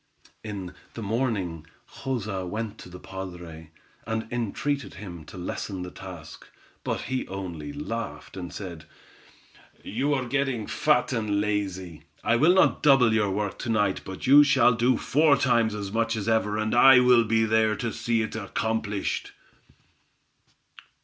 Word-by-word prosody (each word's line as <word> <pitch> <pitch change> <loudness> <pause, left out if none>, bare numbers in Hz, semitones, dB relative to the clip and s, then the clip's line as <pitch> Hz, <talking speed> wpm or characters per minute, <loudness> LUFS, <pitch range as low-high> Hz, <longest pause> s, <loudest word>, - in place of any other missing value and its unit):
In 100 -4 -6 0.2
the 115 - -5
morning 100 -8 -2 0.3
Joza 110 -8 -3
went 105 +4 -5
to - - -11
the 90 - -10
padre, 90 -5 -8 0.4
and 110 0 -2
entreated 130 +5 -2
him 85 -5 -9
to - - -11
lessen 90 +1 -4
the 90 - -7
task, - - -10 0.4
but - - -2
he 130 0 -3
only 95 - -6
laughed, 115 -9 -6
and 90 -2 -6
said: 85 -5 -8 1.0
"You 140 +7 0
are 130 -2 -2
getting 135 -3 -1
fat 150 +1 +1
and 105 -3 0
lazy. 95 -5 -2 0.2
I 115 - +3
will 155 +9 +5
not 190 - +4
double 135 -6 +5
your 105 -2 +2
work 100 +1 -2
to 125 - -4
night, 105 -4 +1
but 95 0 -7
you 145 +3 +8
shall 130 -4 +4
do 120 +1 +2
four 150 0 +3
times 115 -4 +2
as 100 -2 -5
much 115 +1 0
as 105 -1 -4
ever, 110 -2 +1
and 110 0 -1
I 130 +1 +8
will 125 -1 +5
be 115 0 +2
there 110 0 +2
to 115 0 -3
see 115 +1 0
it 110 - -5
accomplished." 110 0 -2
110 Hz, 155 wpm, -26 LUFS, 95-120 Hz, 1.0 s, you